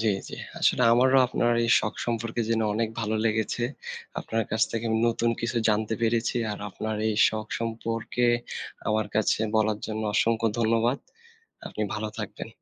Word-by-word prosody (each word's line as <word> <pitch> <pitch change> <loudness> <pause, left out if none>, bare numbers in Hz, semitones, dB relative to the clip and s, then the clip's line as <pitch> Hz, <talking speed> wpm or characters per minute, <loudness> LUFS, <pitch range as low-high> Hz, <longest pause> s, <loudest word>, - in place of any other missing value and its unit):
জি, 110 -1 +2 0.2
জি। - - -7 0.2
আসলে 125 - +3
আমারও 130 +2 +5
আপনার 120 -1 +1
এই - - -1
শখ 110 - -3
সম্পর্কে 115 0 -2
জেনে 115 -1 +1
অনেক 115 +1 0
ভালো 110 0 -1
লেগেছে। 110 +2 0 0.6
আপনার 115 0 -1
কাছ 110 0 +1
থেকে 115 0 -3
আমি 110 - +2
নতুন 115 0 +1
কিছু 115 +1 -2
জানতে 110 +1 +1
পেরেছি। 115 +1 +1 0.2
আর 105 - -6
আপনার 110 +2 -4
এই 110 - 0
শখ 110 0 -4
সম্পর্কে 115 +1 -1 0.6
আমার 110 0 +1
কাছে 110 0 +2 0.2
বলার 110 -1 +2
জন্য 110 0 -3
অসংখ্য 115 +1 +2
ধন্যবাদ। 115 +3 +2 0.7
আপনি 105 - -4
ভালো 110 0 -3
থাকবেন। - - -6
115 Hz, 160 wpm, -26 LUFS, 110-115 Hz, 0.7 s, আমারও